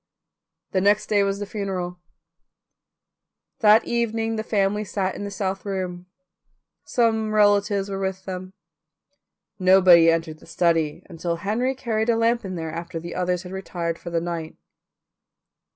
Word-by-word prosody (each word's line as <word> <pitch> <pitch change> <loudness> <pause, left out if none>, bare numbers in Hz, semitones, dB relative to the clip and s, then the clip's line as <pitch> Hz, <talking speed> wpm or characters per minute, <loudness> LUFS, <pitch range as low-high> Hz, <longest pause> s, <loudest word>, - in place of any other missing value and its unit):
The 190 - +1
next 205 +2 +2
day 205 -1 +3
was 200 0 0
the 205 - -4
funeral. 190 -4 -4 1.6
That 220 -1 +6
evening 225 -1 -1
the 220 - -2
family 210 -1 0
sat 190 -2 -2
in 205 - -6
the - - -4
south 195 -1 -3
room. 185 -3 -4 0.8
Some 220 -2 +1
relatives 205 -1 +3
were 195 -1 -4
with 190 -1 -3
them. 185 0 -6 1.1
Nobody 185 -3 +7
entered 165 -1 -1
the - - -17
study 165 -3 +1
until 170 -1 -3
Henry 220 +9 -1
carried 225 -3 -1
a 235 - +4
lamp 230 +1 +2
in 185 -2 -5
there 160 -2 -4
after 170 +1 -5
the 170 +1 -7
others 180 0 -1
had 180 - -9
retired 175 -3 -4
for 170 - -7
the 170 -1 0
night. 165 -2 -5
190 Hz, 150 wpm, -23 LUFS, 175-210 Hz, 1.6 s, Nobody